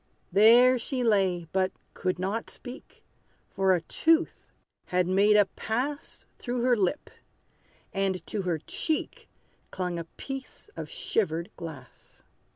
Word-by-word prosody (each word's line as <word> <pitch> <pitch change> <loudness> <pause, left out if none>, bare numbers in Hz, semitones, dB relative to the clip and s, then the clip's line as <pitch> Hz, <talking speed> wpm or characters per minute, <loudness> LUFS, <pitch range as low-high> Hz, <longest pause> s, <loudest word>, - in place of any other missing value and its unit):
There 240 +5 +7
she 255 +1 -2
lay, 190 -6 +2
but 185 0 +1 0.2
could 185 -1 -1
not 195 +5 -2
speak; 255 +2 -11 0.5
For 190 -1 +3
a 175 - -1
tooth 325 - +1 0.3
had 180 0 +1
made 200 +3 +4
a 205 - +6
pass 255 +9 -4
Through 245 0 -2
her 250 -1 +4
lip; 205 +7 -1 0.8
and 195 -2 -1
to 210 - -2
her 180 -3 0
cheek 310 - -3 0.4
Clung 180 -2 -3
a 165 - -5
piece 270 - -8
of - - -6
shivered 180 - -1
glass. 150 -7 -11
200 Hz, 130 wpm, -28 LUFS, 180-245 Hz, 0.8 s, There